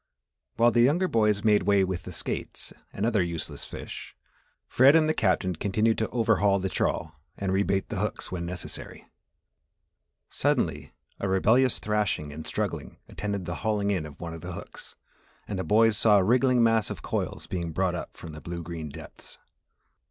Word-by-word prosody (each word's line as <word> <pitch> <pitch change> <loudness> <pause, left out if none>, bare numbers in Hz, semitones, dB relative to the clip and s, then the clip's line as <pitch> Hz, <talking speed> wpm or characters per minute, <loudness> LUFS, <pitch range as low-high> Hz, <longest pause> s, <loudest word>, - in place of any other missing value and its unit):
While 120 +1 +5
the 120 - +4
younger 155 +10 +3
boys 105 - +2
made 105 -2 +4
way 100 +1 +3
with 95 -2 -2
the - - -9
skates - - -5 0.2
and 100 - -2
other 110 -4 +2
useless 85 -2 -4
fish, - - -8 0.5
Fred 135 +4 +6
and 160 -1 +5
the 155 - +2
Captain 95 - +1
continued 110 +6 +1
to 110 - 0
overhaul 105 -4 +3
the 95 0 -2
trawl 80 - -1 0.2
and 95 -1 -2
rebait 95 0 +1
the 105 - -3
hooks 105 +1 -3
when 90 -2 -3
necessary. 90 0 -6 1.2
Suddenly, - - 0 0.3
a 100 - -1
rebellious 115 +7 +3
thrashing 105 -8 -1
and 80 +1 -7
struggling - - -3
attended 100 -2 -3
the 85 +1 -4
hauling 105 -2 +1
in 90 -6 -1
of 70 - -14
one 85 -1 -6
of 80 - -8
the - - -6
hooks - - -9 0.5
and 100 -2 -3
the - - -1
boys 110 +1 +4
saw 105 -2 +6
a 95 - +4
wriggling 125 +3 +4
mass 115 -2 +3
of - - -7
coils - - -3
being 85 -2 -3
brought 90 +2 0
up 85 - -6
from 80 - -9
the 75 0 -9
blue 85 0 -5
green 80 -2 -6
depths. - - -10
100 Hz, 180 wpm, -27 LUFS, 90-110 Hz, 1.2 s, Fred